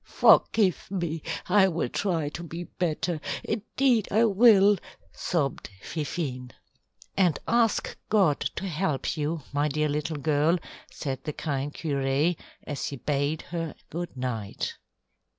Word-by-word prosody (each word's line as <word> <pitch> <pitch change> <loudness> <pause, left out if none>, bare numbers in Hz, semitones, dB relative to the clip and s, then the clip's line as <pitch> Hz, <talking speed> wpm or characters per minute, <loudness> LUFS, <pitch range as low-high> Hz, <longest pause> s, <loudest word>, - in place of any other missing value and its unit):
"Forgive 195 -6 +4
me, 170 -4 -2 0.3
I 200 -2 +5
will 170 -7 -1
try 165 -5 -1
to 160 - -7
be 170 +1 -6
better; 170 -2 -2 0.2
indeed 230 +1 +1
I 225 +3 +4
will," 205 -2 +6 0.4
sobbed 145 - -1
Fifine. 140 - -4 0.7
"And 180 -6 +3
ask 230 -2 +2
God 190 -9 +4 0.2
to - - -4
help 165 -4 -1
you, 155 0 -2
my 145 +1 +2
dear 150 +1 0
little 150 +2 -2
girl," 155 +3 +2 0.3
said 135 -3 -4
the 150 - -3
kind 140 -2 -2
curé, 145 +2 0 0.3
as 145 -2 -4
he 140 - -4
bade 145 +3 -1
her 165 -2 -4 0.2
good 170 -3 -5
night. 115 -5 -3
160 Hz, 130 wpm, -27 LUFS, 145-190 Hz, 0.7 s, will